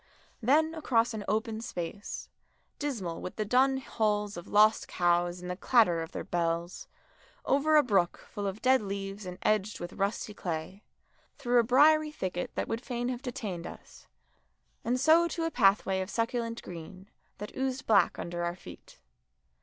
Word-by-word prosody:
Then 310 +7 +3
across 240 -8 +1
an 215 -2 -4
open 220 +1 -1
place, 190 -1 -6 0.5
dismal 220 - -3
with 180 - -6
the 215 - -2
dun 265 +5 +3
hulls 210 -5 -1
of 175 - -8
lost 215 +1 +4
cows 175 0 +1
and 180 - -4
the - - -3
clatter 195 -6 +3
of 165 - -6
their - - -5
bells, 170 +1 -2 0.6
over 300 +3 +3
a 300 - +7
brook 195 -8 +1
full 205 -1 -3
of 195 +2 -5
dead 260 -1 +5
leaves 195 0 -5
and 180 0 -7
edged 210 -1 +1
with 175 +1 -6
rusty 200 +2 -2
clay, 175 +1 -5 0.6
through 245 0 +2
a - - +4
briery 305 +6 +5
thicket 185 -11 -4
that - - -2
would 225 +1 -3
fain 245 -1 -3
have 250 -1 -4
detained 210 -9 -5
us, - - -13 0.8
and 250 +2 0
so 320 +5 +5
to 335 0 -3
a 330 - -1
pathway 195 -4 +3
of 185 - -5
succulent 230 0 -2
green, 180 +3 -10 0.3
that 210 - -8
oozed 265 +1 -2
black 210 -3 +4
under 175 0 -4
our 175 0 -2
feet. 180 - -13
215 Hz, 170 wpm, -29 LUFS, 185-250 Hz, 0.8 s, a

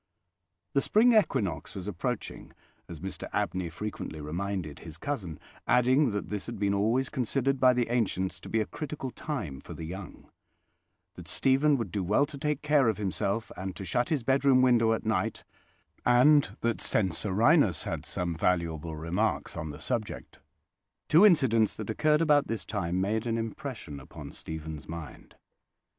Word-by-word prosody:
The 140 - +3
spring 235 - +4
equinox 130 - +1
was 95 0 -6
approaching, 100 -5 -4 0.4
as 85 -3 -8
Mr 95 +3 -6
Abney 90 -2 -1
frequently 90 -3 -6
reminded 85 0 -4
his 80 -2 -10
cousin, 95 - -4 0.3
adding 130 +3 +4
that 105 -2 -3
this 105 -2 -4
had 115 - -5
been 100 0 +1
always 115 +6 +1
considered 135 +2 0
by 125 -1 +5
the 120 -1 +1
ancients 105 -6 -1
to - - -10
be 110 - +1
a - - 0
critical 145 -2 -5
time 105 - -5
for - - -9
the - - -7
young: 90 +3 -8 0.9
that - - -11
Stephen 140 +2 +3
would 115 - -4
do 100 -2 -1
well 105 +10 +3
to 145 -1 -10
take 150 0 -1
care 150 -5 +4
of 110 - -1
himself, 100 +2 -2
and 95 0 -5
to 95 - -7
shut 120 - 0
his 150 -7 0
bedroom 135 0 +4
window 115 -3 +4
at 110 - -3
night; 110 0 -1 0.6
and 125 -2 +5
that 115 -1 0
Censorinus 105 - +2
had - - -4
some 90 -1 -3
valuable 80 -2 -1
remarks 90 +8 -1
on 80 - -4
the 75 0 -8
subject. 110 +5 -4 0.7
Two 175 +7 +8
incidents 120 - +3
that 110 0 -4
occurred 150 +6 +2
about 145 -3 +4
this 115 -1 -3
time 90 -4 -2
made 110 +4 0
an 115 0 0
impression 115 - -5
upon 65 - -10
Stephen's 80 -1 -7
mind. 80 -2 -9
110 Hz, 165 wpm, -29 LUFS, 90-130 Hz, 0.9 s, Two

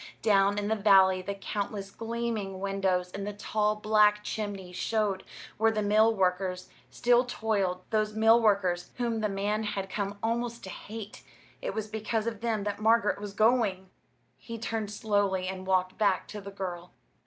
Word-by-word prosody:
Down 200 -1 +4
in 205 0 -1
the 220 - +1
valley 190 -3 +5
the 200 +2 -4
countless 200 0 -4
gleaming 225 -4 -3
windows 190 -2 0
and 200 +1 -5
the 210 - -3
tall 210 +1 0
black 210 -1 +3
chimneys 200 -4 -5
showed 210 -2 0 0.3
where 225 +1 +4
the 215 -1 -1
mill 215 +2 +4
workers 185 -1 0 0.2
still 245 0 +3
toiled 200 -7 -1
those 215 -1 0
mill 225 +2 +5
workers 190 -5 +1
whom 235 -2 -1
the 215 -1 0
man 205 +2 -1
had 195 -2 -3
come 200 -1 -3
almost 235 +1 -2
to 190 - -7
hate: 215 +1 -8 0.4
it - - -4
was 220 -1 -3
because 220 +1 -2
of 230 -2 -4
them 225 -3 -1
that 205 0 -3
Margaret 220 -2 +3
was 205 -1 -6
going! 210 -4 +2 0.5
He 230 -1 -7
turned 225 -2 -3
slowly 205 -3 0
and 185 0 -5
walked 185 0 +1
back 200 -3 +2
to 210 - -7
the 200 - -8
girl. 180 -3 -6
205 Hz, 170 wpm, -29 LUFS, 195-220 Hz, 0.5 s, valley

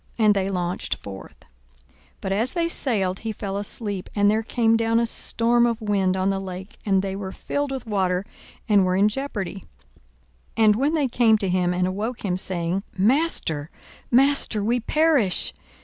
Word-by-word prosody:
And 215 -2 +5
they 195 -1 -1
launched 180 -1 -2
forth. 95 -1 -11 0.5
42:008:023 - - -32 0.3
But 190 - -3
as 225 +6 +1
they 335 -1 0
sailed 200 - -1
he 225 - -4
fell 200 -2 -5
asleep: 205 -1 -3
and 205 0 +4
there 220 +1 +1
came 225 0 +2
down 230 0 +2
a 235 - +2
storm 235 +1 +1
of 230 -1 -1
wind 195 -4 +1
on 190 +1 +1
the 195 - -1
lake; 190 +1 -8
and 195 -2 +2
they 195 -1 -3
were 195 -1 -5
filled 285 +7 -3
with 265 -3 -5
water, 190 -3 0 0.4
and 205 -3 +5
were 185 0 +1
in 200 +2 +4
jeopardy. 205 -7 -5 0.9
42:008:024 220 +3 +4
And 315 - +1
they 295 -4 +2
came 230 -3 +4
to 195 -3 -1
him, 180 -1 +1
and 180 0 0
awoke 210 +6 -3
him, 180 -2 0
saying, 180 0 -2 0.2
Master, 195 - +1 0.4
master, 260 -4 +3
we 235 +4 +1
perish. 285 - +1
205 Hz, 180 wpm, -23 LUFS, 190-235 Hz, 0.9 s, And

